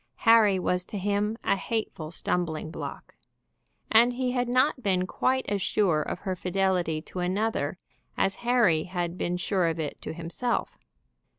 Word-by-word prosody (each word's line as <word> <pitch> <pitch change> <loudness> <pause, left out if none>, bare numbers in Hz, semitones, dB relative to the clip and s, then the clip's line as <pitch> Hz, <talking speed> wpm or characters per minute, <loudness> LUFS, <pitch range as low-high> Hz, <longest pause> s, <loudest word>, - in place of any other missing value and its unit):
Harry 220 -4 +6
was 180 0 0
to 205 - -7
him 205 +3 0
a - - +2
hateful 200 -7 -3
stumbling 165 -2 -2
block. - - -7 0.8
And 235 +2 +6
he 250 0 -1
had 245 -1 0
not 255 +2 +2
been 185 -4 +1
quite 260 +7 0
as 200 -1 -1
sure 175 -6 +2
of - - -4
her 190 -2 -2
fidelity 180 -4 0
to 185 - -7
another 185 -3 -1 0.4
as 195 - +1
Harry 235 -10 +3
had 175 -2 -3
been 180 -1 -2
sure 180 -1 +1
of 165 0 -2
it 150 -2 -4
to - - -5
himself. 170 +9 -3
190 Hz, 160 wpm, -27 LUFS, 175-225 Hz, 0.8 s, Harry